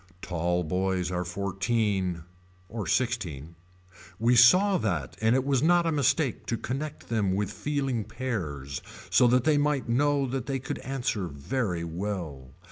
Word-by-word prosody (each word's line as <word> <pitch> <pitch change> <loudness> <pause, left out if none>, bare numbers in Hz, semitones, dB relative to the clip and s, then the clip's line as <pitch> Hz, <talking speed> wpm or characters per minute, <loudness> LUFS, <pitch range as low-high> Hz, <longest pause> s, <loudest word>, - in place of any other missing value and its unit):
Tall 90 0 0
boys 90 +2 -1
are 90 0 -1
fourteen. 95 -1 -1 0.5
Or 110 -3 -5
sixteen. 85 - -1 0.6
We 115 +3 +3
saw 185 - +6
that 85 - -2
and 110 +2 +3
it 130 - +2
was 135 -2 +2
not 175 +2 +4
a 165 - +1
mistake 145 -2 +1
to 115 - -1
connect 140 +7 -5
them 105 -5 +1
with 100 0 -1
feeling 135 -7 -2
pears 85 - -4 0.3
so 125 - +6
that 125 0 +3
they 150 0 +3
might 145 -3 0
know 140 +3 +2
that 130 -1 -3
they 135 -1 -1
could 130 - -5
answer 125 -8 -2
very 85 - -2
well. 85 -6 -5
110 Hz, 150 wpm, -27 LUFS, 90-135 Hz, 0.6 s, saw